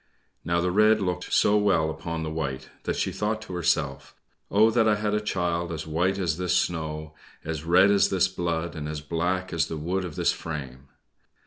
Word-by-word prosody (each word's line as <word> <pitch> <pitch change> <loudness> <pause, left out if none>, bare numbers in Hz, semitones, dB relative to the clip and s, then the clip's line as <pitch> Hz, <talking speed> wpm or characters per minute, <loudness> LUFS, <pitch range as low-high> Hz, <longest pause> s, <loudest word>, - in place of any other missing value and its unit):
Now 85 0 +1
the 90 +1 0
red 105 +3 +5
looked 90 -2 -3
so 105 0 +4
well 90 -7 +2
upon 85 0 -5
the 80 - -3
white 70 -5 -4 0.2
that - - -1
she - - -1
thought 105 +1 -1
to 100 - -9
herself, 90 -2 -1 0.3
"Oh, 110 +3 +5
that 115 -1 +3
I 105 - +4
had 105 0 -1
a 105 - +1
child 85 -4 -1
as 80 - -4
white 90 +5 0
as 85 -3 -1
this 90 0 +1
snow, 80 -2 -2 0.3
as 80 -1 -4
red 90 +4 +5
as 100 -1 +4
this 95 -1 +3
blood, 85 -2 -3
and 75 -1 -5
as 75 0 -4
black 90 +4 -2
as 80 -3 +1
the 80 - -5
wood 90 +5 -2
of 85 -4 -6
this - - +2
frame!" 70 -4 -7
85 Hz, 205 wpm, -26 LUFS, 80-95 Hz, 0.3 s, red